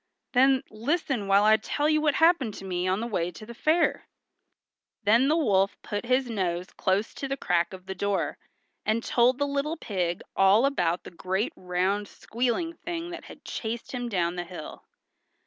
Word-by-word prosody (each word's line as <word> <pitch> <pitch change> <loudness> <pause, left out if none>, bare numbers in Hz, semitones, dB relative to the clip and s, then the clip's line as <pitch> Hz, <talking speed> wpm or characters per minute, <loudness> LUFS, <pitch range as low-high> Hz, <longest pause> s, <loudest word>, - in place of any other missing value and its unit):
"Then, 265 +1 +4
listen 240 - -1
while 200 +1 +5
I 215 +1 +6
tell 290 +7 -1
you 310 0 +3
what 300 -2 +2
happened 320 - +3
to 195 - -9
me 180 -1 -1
on 190 +3 +1
the - - -2
way 180 -7 -1
to 180 +5 -11
the 235 - -9
fair." 315 +8 +1 1.0
Then 230 +6 +4
the 310 +3 +3
wolf 200 -10 +2
put 205 +3 -4
his 255 +1 +2
nose 185 -5 -2
close 195 +4 0
to 275 - -5
the 275 0 -2
crack 175 -8 +1
of 185 -1 -10
the 190 - -4
door, 190 -5 -1 0.4
and 220 +2 0
told 245 +1 +3
the 285 - +1
little 285 +3 -1
pig 180 - -2
all 195 +6 +5
about 175 -11 0
the - - -10
great 190 +5 -2
round 185 +3 -1
squealing 250 - -2
thing 340 0 -5
that 345 - -8
had - - -13
chased 230 +1 -4
him 245 -2 -3
down 180 -4 0
the 175 - -2
hill. 175 -3 -9
215 Hz, 185 wpm, -27 LUFS, 190-270 Hz, 1.0 s, I